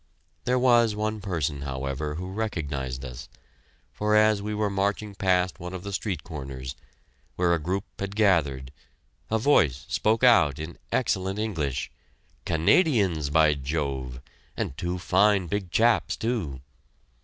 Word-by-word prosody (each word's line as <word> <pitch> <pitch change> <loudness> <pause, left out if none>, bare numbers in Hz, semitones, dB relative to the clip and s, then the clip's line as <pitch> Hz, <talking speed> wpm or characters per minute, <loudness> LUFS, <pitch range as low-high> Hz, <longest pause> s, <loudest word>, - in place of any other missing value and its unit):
There 125 +1 +2
was 120 -3 +4
one 110 0 -2
person, 80 -7 -2
however, 70 +2 -3
who 90 +3 -5
recognized 70 - -3
us, 60 -1 -8 0.6
for 105 0 +1
as 110 -1 +4
we 105 +1 -3
were 105 0 +1
marching 100 +1 -1
past 90 -5 +1
one 90 +1 -6
of 90 - -7
the 100 0 -6
street 95 -5 -3
corners, 65 -5 -7 0.6
where 90 -1 +2
a 85 - +1
group 90 +5 -2 0.2
had 100 0 -4
gathered, 75 -11 +2 0.6
a 110 - +2
voice 80 - +3
spoke 110 +3 +1
out 110 - +5
in 80 +2 -7
excellent 95 +1 0
English, 80 - -2 0.5
"Canadians, 85 - +2
by 75 0 +4
Jove! 70 -3 -3 0.4
And 70 - -3
two 85 +4 -3
fine 100 +1 +3
big 95 +1 -3
chaps, 115 +5 +2
too!" 105 - -3
90 Hz, 140 wpm, -26 LUFS, 70-105 Hz, 0.6 s, out